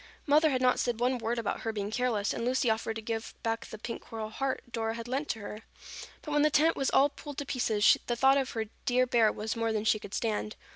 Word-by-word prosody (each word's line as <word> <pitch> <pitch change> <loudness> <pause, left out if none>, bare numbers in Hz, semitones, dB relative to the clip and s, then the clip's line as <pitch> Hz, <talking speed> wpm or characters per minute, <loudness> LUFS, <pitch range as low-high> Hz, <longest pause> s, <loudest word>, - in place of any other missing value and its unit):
Mother 310 +2 +5
had 260 -2 0
not 250 0 +4
said 240 -2 -1
one 250 +1 +1
word 235 +1 -2
about 230 - -2
her 225 - -2
being 205 -1 -4
careless 225 -4 0
and 230 - -4
Lucy 250 -1 +2
offered 220 0 -2
to 225 - -6
give 225 0 -4
back 225 0 -2
the 215 - -8
pink 230 +2 -6
coral 220 -1 -6
heart 270 +3 -2
Dora 225 -1 -2
had 230 0 -6
lent 270 +4 -2
to 225 - -2
her. 210 +1 -7 0.6
But 300 - -6
when 295 0 +3
the 305 - +5
tent 315 +2 +3
was 270 - 0
all 280 +2 +4
pulled 290 0 -10
to 285 - -3
pieces, 225 -6 +3
the 240 - 0
thought 270 +3 +5
of 265 -1 -2
her 225 -1 -2 0.2
dear 255 +1 +3
bear 230 -3 +3
was 220 +1 -4
more 230 0 0
than 215 -1 -1
she 215 -1 +3
could 205 -1 -7
stand. 215 -1 -2
230 Hz, 255 wpm, -30 LUFS, 220-260 Hz, 0.6 s, Mother